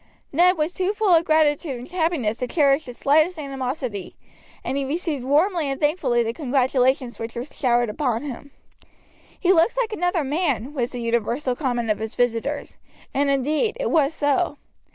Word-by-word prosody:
Ned 355 +4 +4
was 310 +3 -1
too 375 +2 0
full 420 -3 +2
of 330 0 +4
gratitude 305 -2 +2
and 245 +2 -9
happiness 320 -11 -1
to 250 - -3
cherish 285 0 +2
the 245 - -8
slightest 315 +7 +2
animosity, 260 - -4 0.5
and - - -2
he 280 - 0
received 295 -1 -2
warmly 310 +3 +2
and 270 - -3
thankfully 290 -6 +1
the 230 0 -2
congratulations 260 -2 +1
which 225 +1 -6
were 240 - -3
showered 240 -5 +1
upon 240 +1 -1
him. 285 0 -7 0.9
"He 375 +1 +4
looks 360 +8 +3
another 355 -4 0
man," 285 -3 -1
was 245 -4 -1
the 245 - -6
universal 235 +3 0
comment 245 -5 -1
of 210 - -1
his 220 +1 -5
visitors; 245 +4 -1 0.4
and, 280 +1 +1
indeed, 300 - +1
it - - -1
was 310 -1 +2
so. 290 +2 +1
280 Hz, 170 wpm, -23 LUFS, 245-320 Hz, 0.9 s, Ned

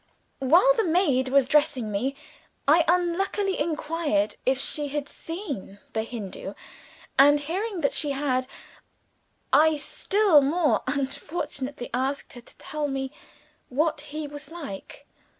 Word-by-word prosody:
While 345 - +5
the 455 -3 +1
maid 315 -8 +2
was 275 -1 +4
dressing 290 -6 +2
me, 255 +7 -1 0.5
I 320 +4 +6
unluckily 360 +3 +1
inquired 300 -8 0
if 260 0 +4
she 295 +2 -1
had 290 0 -3
seen 310 - -6 0.2
the 220 - 0
Hindoo 220 -4 -6 0.6
and, 290 +2 +7
hearing 365 +6 -3
that 280 - +1
she 295 - +1
had, 270 -2 0 1.1
I 310 +2 +6
still 385 +2 +3
more 305 +3 +2
unfortunately 275 -1 -4
asked 265 +3 -2
her 245 - -10
to - - -17
tell 300 -1 -3
me 270 -1 -3 0.6
what 310 +3 0
he 300 +1 -6
was 290 0 -9
like. 300 - -8
290 Hz, 130 wpm, -26 LUFS, 265-330 Hz, 1.1 s, and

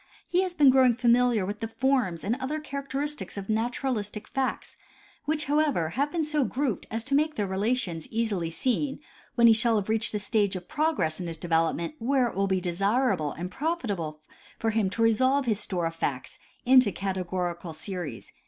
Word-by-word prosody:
He 360 +1 +2
has 370 -2 -2
been 285 -5 +6
growing 255 -2 +5
familiar 240 -3 +3
with 205 +2 -5
the 225 - -3
forms 225 - 0
and 215 +4 0
other 275 +4 -3
character 280 -2 -5
istics 295 -6 -4
of 195 0 -6
naturalistic 220 -2 -2
facts 270 -1 -3 0.5
which, 310 +1 0
however, 290 - +1
have 280 - -1
been 335 -2 0
so 300 -1 +1
grouped 255 -3 -2
as 225 +1 -1
to 275 - -3
make 305 +2 +2
their 205 - 0
relations 195 -3 -1
easily 215 -7 -1
seen 260 - -1 0.4
when 235 - +5
he 230 - +8
shall 225 +1 +3
have 205 -1 -1
reached 220 0 +1
the 210 - -1
stage 205 -1 0
of 180 -1 -7
progress 295 - 0
in 180 - -4
his 165 -1 -5
development 165 - 0
where 255 +1 +2
it - - -10
will 195 +1 +1
be 190 -1 +1
desira 200 +9 +1
ble 150 -2 -3
and 180 +2 -6
profitable 205 - -3 0.4
for 225 - 0
him 215 -3 +1
to 230 +4 -1
resolve 260 +5 +3
his 215 -4 0
store 180 -5 -2
of 165 - -2
facts 140 -5 -3 0.3
into 255 -4 +6
cate 195 0 -3
gorical 175 -2 -3
series. 160 - -5
225 Hz, 195 wpm, -27 LUFS, 185-265 Hz, 0.5 s, he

